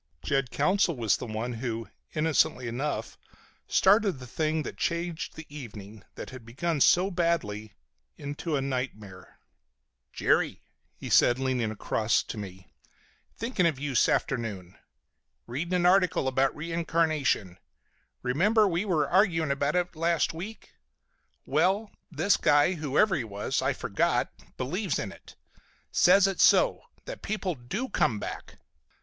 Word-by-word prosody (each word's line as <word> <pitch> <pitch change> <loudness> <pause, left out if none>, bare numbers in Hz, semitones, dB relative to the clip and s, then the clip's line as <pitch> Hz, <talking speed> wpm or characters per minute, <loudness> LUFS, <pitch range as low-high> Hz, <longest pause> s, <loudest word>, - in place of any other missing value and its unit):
Jed 135 -2 0
Counsell 185 -3 +2
was 115 -4 +2
the 125 - -7
one 110 +3 -3
who, 115 -2 -4 0.3
innocently 155 -5 +1
enough, 135 +6 -3 0.5
started 200 0 +4
the 130 -2 -10
thing 155 +4 -1
that - - -6
changed 170 -1 -3
the 160 - -9
evening, 110 -7 -10
that - - -8
had 130 -2 -10
begun 145 +7 -2
so 185 +7 +4
badly, 155 - -1 0.4
into 145 +2 -4
a 140 - 0
nightmare. 110 -8 -5 0.7
"Jerry," - - +1 0.3
he - - -8
said, 120 - +5
leaning 130 -4 0
across 110 +1 0
to 110 - -7
me, 95 -2 -10 0.6
"thinkin' 225 -6 +1
of 155 -5 -1
you 145 +1 -3
s'afternoon. 110 -8 0 0.7
Readin' 160 +9 -3
an 175 -1 +1
article 180 -6 +3
about 130 +1 +1
reincarnation. 155 - 0 0.6
Remember 205 - +3
we 175 0 0
were 175 -7 +1
arguin' 170 -6 +2
it 170 +6 0
last 165 +1 +1
week? 195 +7 -8 0.7
Well, 200 +3 +1 0.2
this 200 - +2
guy, 145 +5 +4
whoever 160 +5 +2
he 140 - -1
was 105 -2 -2
I've - - 0
forgot, - - 0 0.3
believes 180 +10 -2
in 100 - -4
it. - - -15 0.6
Says 185 +2 +5
it's 195 -1 +2
so. - - +4 0.2
That - - -7
people 205 -4 -2
do 150 - -4
come 155 - +1
back." - - -7
150 Hz, 135 wpm, -28 LUFS, 120-175 Hz, 0.7 s, said